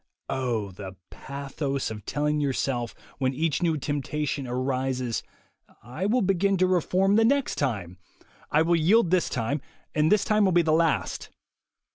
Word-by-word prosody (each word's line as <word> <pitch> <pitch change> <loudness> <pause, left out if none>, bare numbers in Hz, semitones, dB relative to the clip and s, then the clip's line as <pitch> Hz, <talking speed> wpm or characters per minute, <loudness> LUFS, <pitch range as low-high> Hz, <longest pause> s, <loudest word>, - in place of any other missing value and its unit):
Oh, 120 -7 -1
the 95 0 -8 0.2
pathos 140 -1 -4
of 105 -2 -8
telling 150 +1 0
yourself, 130 -4 -1 0.2
when 130 -1 0
each 155 +1 0
new 165 -3 +1
temptation 145 -1 -2
arises: 130 -1 -1 0.6
"I 130 - -3
will 240 +2 +2
begin 195 +1 +2
to 185 - +3
reform 185 +2 +2
the 225 - +5
next 275 +3 +1
time. 100 - -2 0.5
I 155 +2 +3
will 170 +1 +3
yield 175 +4 +4
this 185 -2 +2
time, 130 +4 -2 0.3
and 155 +1 +2
this 210 - +3
will 215 -3 +3
be 175 -1 +4
the 155 -1 +2
last." 165 0 0
150 Hz, 150 wpm, -26 LUFS, 130-180 Hz, 0.6 s, the